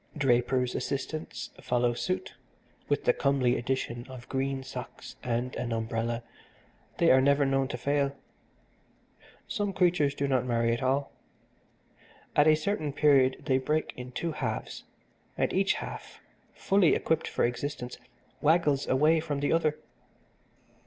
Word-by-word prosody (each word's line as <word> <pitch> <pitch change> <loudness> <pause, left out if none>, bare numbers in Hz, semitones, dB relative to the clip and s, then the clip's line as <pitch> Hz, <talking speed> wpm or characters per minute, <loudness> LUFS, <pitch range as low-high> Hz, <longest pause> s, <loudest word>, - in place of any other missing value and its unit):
Drapers' 125 -2 +2
assistants 155 +3 -4
follow 120 -1 +1
suit, 120 -6 -3 0.6
with - - +1
the - - +4
comely 135 -3 +2
addition 120 -1 -3
of 130 -2 -10
green 135 0 -2
socks 130 -1 -8
and 125 +1 -2
an 120 -1 -3
umbrella 115 +1 -2 0.7
they 170 - +5
are 130 - +6
never 140 +1 +4
known 135 0 +1
to 125 - -5
fail. 140 +2 0 1.3
Some 205 -4 -1
creatures 175 -6 +2
do 140 - -1
not 130 -3 +2
marry 115 -1 +1
at 120 - -3
all. 135 +2 0 1.2
At 145 +1 +5
a 155 - +7
certain 155 -2 -2
period 135 -3 +3
they 130 -3 +2
break 155 +4 -1
in 125 0 -8
two 165 +6 -3
halves, - - -4 0.5
and - - 0
each - - +3
half, - - -7 0.4
fully 195 -4 +3
equipped 160 -1 0
for - - +1
existence, 125 +1 -4 0.4
waggles 150 -3 +3
away 155 +5 +4
from 150 -3 -3
the 145 - +1
other. 155 -2 +1
135 Hz, 140 wpm, -29 LUFS, 125-150 Hz, 1.3 s, a